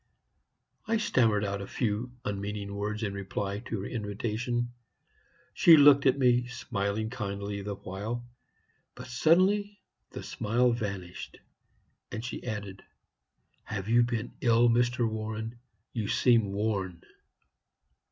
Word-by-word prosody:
"I 225 +1 +2
stammered 110 - +2
out 100 0 -3
a 100 - -6
few 115 +1 -2
unmeaning 100 0 -3
words 105 +2 -3
in 100 -2 -2
reply 100 +1 -3
to 110 -5 -3
her - - -5
invitation. 120 +3 -2 0.8
She 165 -2 +8
looked 140 -1 +7
at 130 - +4
me, 125 -2 +3
smiling 110 -3 -2
kindly 100 -3 -4
the 100 0 -4
while; 105 +6 -5 0.7
but - - -9
suddenly 190 +9 +2 0.3
the - - -8
smile 120 +3 +1
vanished, 100 -6 -5 0.7
and 110 +2 -5
she 120 - -5
added, 100 -5 -5 0.8
'Have 100 -2 -4
you 120 +1 +5
been 120 -1 -1
ill, 120 0 +5
Mr. 120 0 +2
Warren? 110 +1 -4 0.3
You 110 -3 -2
seem 115 -2 +3
worn.' 100 -4 -2
110 Hz, 125 wpm, -29 LUFS, 100-120 Hz, 0.8 s, She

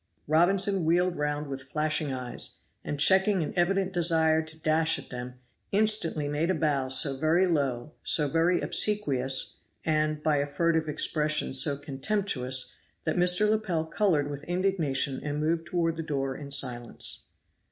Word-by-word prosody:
Robinson 185 +4 +2
wheeled 175 +2 +1
round 150 0 -2
with 135 -2 -6
flashing 150 +1 -1
eyes, 125 -2 -4 0.3
and 145 - -5
checking 190 +3 +4
an - - -5
evident 190 +2 0
desire 160 -2 +3
to 160 0 -11
dash 160 +1 +2
at - - -12
them, 125 0 -7 0.4
instantly 200 -8 +1
made 150 +4 -1
a 185 - +1
bow 145 -5 0
so 135 +1 +4
very 160 +6 +2
low, 140 -6 -1
so 150 -2 +2
very 165 +4 +1
obsequious, 135 -11 +1 0.3
and, 155 -1 0
by 155 -2 +2
a 140 0 -1
furtive 160 +1 0
expression, 150 0 +1
so 140 +2 +3
contemptuous, 140 -3 -1 0.3
that 160 - -1
Mr. 180 +3 +3
Lepel 210 -7 -1
colored 160 -4 0
with 145 0 -7
indignation 170 -7 0
and 150 0 -4
moved 165 +2 -1
toward 165 -2 -1
the - - -3
door 135 -4 -3
in 140 0 -9
silence. 125 -4 -1
155 Hz, 150 wpm, -27 LUFS, 140-175 Hz, 0.4 s, checking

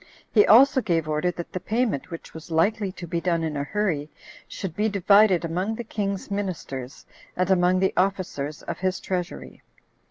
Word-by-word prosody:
He 210 -3 +6
also 260 +4 +7
gave 165 -7 0
order 155 +3 0
that 170 -1 -6
the 185 - -2
payment, 225 - -1
which 165 -2 -9
was 160 0 -10
likely 195 +5 +1
to 180 - -8
be 170 0 -2
done 170 -2 0
in 155 -2 -2
a 140 - -1
hurry, 160 -4 -1 0.4
should 185 -5 -6
be 215 +3 +1
divided 200 -2 +4
among 185 +7 -2
the 240 - -5
king's 200 -3 -4
ministers, 155 -10 -5 0.3
and 185 +1 +1
among 180 0 +4
the 190 - +2
officers 180 -7 -1
of - - -5
his 185 0 -1
treasury. 180 -2 -5
185 Hz, 180 wpm, -25 LUFS, 165-205 Hz, 0.4 s, also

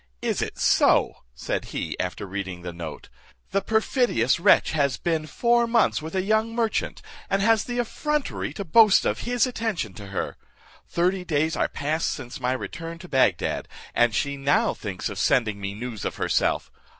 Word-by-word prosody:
"Is - - 0
it - - -4
so?" - - +4 0.2
said - - -3
he, - - -4
after 90 +2 -3
reading 95 -2 -5
the 90 -1 -5
note; 85 -3 -7 0.4
"the 195 - +1
perfidious 220 - +2
wretch - - +5
has 140 -4 +1
been 160 -2 -1
four 235 +5 +2
months 230 -8 +2
with 160 +4 -6
a 185 - +1
young 220 +3 +1
merchant, 230 -2 -1 0.3
and 195 0 +1
has 225 0 +3
the 245 0 -4
effrontery 300 +5 -2
to 200 - -5
boast 215 +3 +6
of - - 0
his 245 0 +3
attention 225 - -3
to 100 +2 -10
her. 95 -1 -4 0.5
Thirty 180 +2 0
days 160 -2 0
are - - 0
past 155 +2 -1
since 120 +1 -6
my 125 +1 +1
return 165 +5 -6
to 180 +2 -11
Bagdad, 130 - +1 0.3
and 120 -3 +3
she 140 +3 -1
now 140 +1 +2
thinks 95 -4 -5
of 100 - -5
sending 105 0 +2
me 100 0 -4
news 115 -2 -6
of - - -3
herself. - - 0
160 Hz, 175 wpm, -25 LUFS, -, 0.5 s, boast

